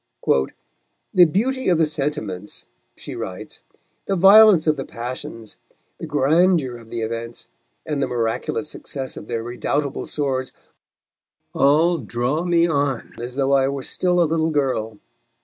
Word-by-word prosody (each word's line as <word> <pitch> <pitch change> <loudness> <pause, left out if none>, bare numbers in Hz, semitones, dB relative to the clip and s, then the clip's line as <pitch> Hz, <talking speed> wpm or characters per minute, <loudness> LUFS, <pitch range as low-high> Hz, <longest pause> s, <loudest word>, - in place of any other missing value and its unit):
"The 180 - +7
beauty 260 +7 0
of 175 - +3
the 160 - +3
sentiments," 145 -10 -4 0.3
she - - -8
writes, - - -7 0.5
"the 195 - +1
violence 195 -1 +7
of 155 -1 +3
the 135 - -4
passions, 115 -3 -8 0.4
the 165 - -6
grandeur 150 -2 +2
of 115 -1 -15
the 115 - -4
events, 115 +1 -5 0.4
and 150 -2 -2
the 135 - +1
miraculous 120 +5 -2
success 135 -3 -6
of - - -9
their 115 -2 -3
redoubtable 140 +4 -2
swords, 130 -3 -2 1.0
all 160 +5 +3
draw 125 +6 -2
me 170 -1 +3
on 140 -6 -1
as 120 +1 -6
though 135 0 +1
I 135 -1 +4
were 140 -1 -3
still 180 +4 0
a 170 - +5
little 160 0 0
girl." 130 -8 -1
140 Hz, 145 wpm, -21 LUFS, 125-165 Hz, 1.0 s, The